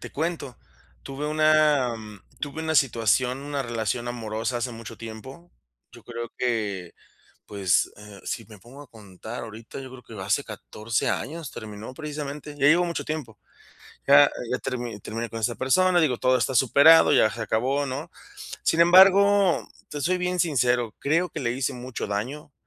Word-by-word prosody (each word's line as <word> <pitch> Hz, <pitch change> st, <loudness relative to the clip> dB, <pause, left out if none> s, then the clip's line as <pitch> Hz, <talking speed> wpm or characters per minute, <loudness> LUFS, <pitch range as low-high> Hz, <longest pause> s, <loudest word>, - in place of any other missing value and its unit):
Te -, -, -9 dB
cuento, 155 Hz, -5 st, -4 dB, 0.4 s
tuve 135 Hz, +2 st, -6 dB
una 155 Hz, -4 st, +3 dB, 0.5 s
tuve 155 Hz, +2 st, -5 dB
una 160 Hz, 0 st, -1 dB
situación, 125 Hz, -1 st, +2 dB
una 140 Hz, 0 st, -4 dB
relación 120 Hz, 0 st, -3 dB
amorosa 115 Hz, 0 st, -3 dB
hace 125 Hz, +1 st, -3 dB
mucho 115 Hz, -1 st, -10 dB
tiempo. 130 Hz, +10 st, -10 dB, 0.4 s
Yo -, -, -14 dB
creo 120 Hz, 0 st, -6 dB
que, 105 Hz, -8 st, -2 dB, 0.5 s
pues, 95 Hz, -4 st, +1 dB
eh, 105 Hz, -1 st, -13 dB
si 115 Hz, -, -4 dB
me 110 Hz, -2 st, -14 dB
pongo 125 Hz, +8 st, -13 dB
a 145 Hz, -, -15 dB
contar 110 Hz, +1 st, -10 dB
ahorita, 115 Hz, +3 st, -9 dB
yo 135 Hz, -, -8 dB
creo 130 Hz, -1 st, -12 dB
que 110 Hz, -4 st, -9 dB
hace 105 Hz, +9 st, 0 dB
14 110 Hz, +1 st, -3 dB
años 155 Hz, +2 st, -4 dB
terminó 110 Hz, +2 st, -9 dB
precisamente. 150 Hz, 0 st, -6 dB
Ya 140 Hz, -1 st, +1 dB
llevo 175 Hz, +4 st, +5 dB
mucho 170 Hz, -1 st, -3 dB
tiempo. 140 Hz, -9 st, -5 dB, 0.7 s
Ya 140 Hz, +1 st, +7 dB, 0.2 s
ya -, -, +1 dB
termi 120 Hz, -4 st, -4 dB
terminé 115 Hz, +3 st, -5 dB
con 115 Hz, 0 st, -6 dB
esa 120 Hz, +1 st, 0 dB
persona, 180 Hz, +7 st, +3 dB
digo, 145 Hz, -7 st, +2 dB
todo 130 Hz, +1 st, +2 dB
está 130 Hz, -, -1 dB
superado, 140 Hz, +6 st, +6 dB
ya 110 Hz, -, +5 dB
se 115 Hz, -, -7 dB
acabó, 130 Hz, +6 st, 0 dB
¿no? 140 Hz, +5 st, -5 dB, 0.5 s
Sin 165 Hz, -, +1 dB
embargo, 190 Hz, +2 st, +6 dB, 0.2 s
te 150 Hz, -, -5 dB
soy 180 Hz, +5 st, +1 dB
bien 180 Hz, 0 st, -2 dB
sincero, 125 Hz, -8 st, +1 dB
creo 165 Hz, +5 st, +1 dB
que 155 Hz, -1 st, -6 dB
le 120 Hz, -, 0 dB
hice 125 Hz, +1 st, -2 dB
mucho 125 Hz, -2 st, -6 dB
daño 130 Hz, +9 st, -5 dB
130 Hz, 165 wpm, -25 LUFS, 115-150 Hz, 0.7 s, Ya